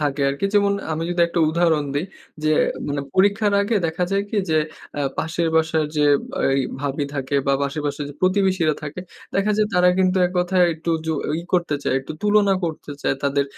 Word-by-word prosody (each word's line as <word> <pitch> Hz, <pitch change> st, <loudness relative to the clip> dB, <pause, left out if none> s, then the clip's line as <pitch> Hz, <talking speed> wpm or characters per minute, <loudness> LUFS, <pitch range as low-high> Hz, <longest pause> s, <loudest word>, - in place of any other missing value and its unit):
থাকে 145 Hz, -1 st, -1 dB
আরকি। 140 Hz, +6 st, -3 dB
যেমন 200 Hz, -1 st, +4 dB, 0.2 s
আমি 160 Hz, +1 st, -2 dB
যদি 175 Hz, 0 st, -1 dB
একটা 170 Hz, 0 st, -1 dB
উদাহরণ 160 Hz, -2 st, +2 dB
দেই, 145 Hz, +5 st, 0 dB, 0.4 s
যে 155 Hz, -, +3 dB, 0.4 s
মানে 145 Hz, 0 st, -1 dB
পরীক্ষার 200 Hz, +2 st, +3 dB
আগে 205 Hz, +3 st, 0 dB
দেখা 165 Hz, +2 st, -1 dB
যায় 195 Hz, 0 st, +1 dB
কি -, -, -2 dB
যে 155 Hz, -, +3 dB, 0.4 s
অ্যা 145 Hz, -, -2 dB, 0.2 s
পাশের 165 Hz, +1 st, -1 dB
বাসার 160 Hz, -1 st, +2 dB
যে 150 Hz, -, +3 dB, 0.4 s
আই 135 Hz, 0 st, +2 dB, 0.2 s
ভাবী 145 Hz, 0 st, -2 dB
থাকে 135 Hz, 0 st, -3 dB
বা 140 Hz, -, +3 dB
পাশের 140 Hz, +2 st, -2 dB
বাসার 145 Hz, 0 st, -3 dB
যে -, -, -12 dB
প্রতিবেশীরা 185 Hz, -4 st, +2 dB
থাকে 150 Hz, +4 st, -6 dB, 0.3 s
দেখা 200 Hz, +2 st, +1 dB
যায় 215 Hz, 0 st, +3 dB
তারা 180 Hz, 0 st, +5 dB
কিন্তু 185 Hz, 0 st, +2 dB
এক 180 Hz, -, -7 dB
কথায় 180 Hz, 0 st, +3 dB
একটু 160 Hz, +1 st, -4 dB, 0.2 s
যু 160 Hz, -, +1 dB, 0.3 s
ই -, -, -9 dB
করতে 170 Hz, -4 st, +1 dB
চায় -, -, 0 dB
একটু 135 Hz, -, -8 dB
তুলনা 205 Hz, -1 st, +4 dB
করতে 160 Hz, -2 st, -5 dB
চায় -, -, +1 dB
তাদের 140 Hz, 0 st, +1 dB
165 Hz, 200 wpm, -22 LUFS, 145-190 Hz, 0.4 s, তারা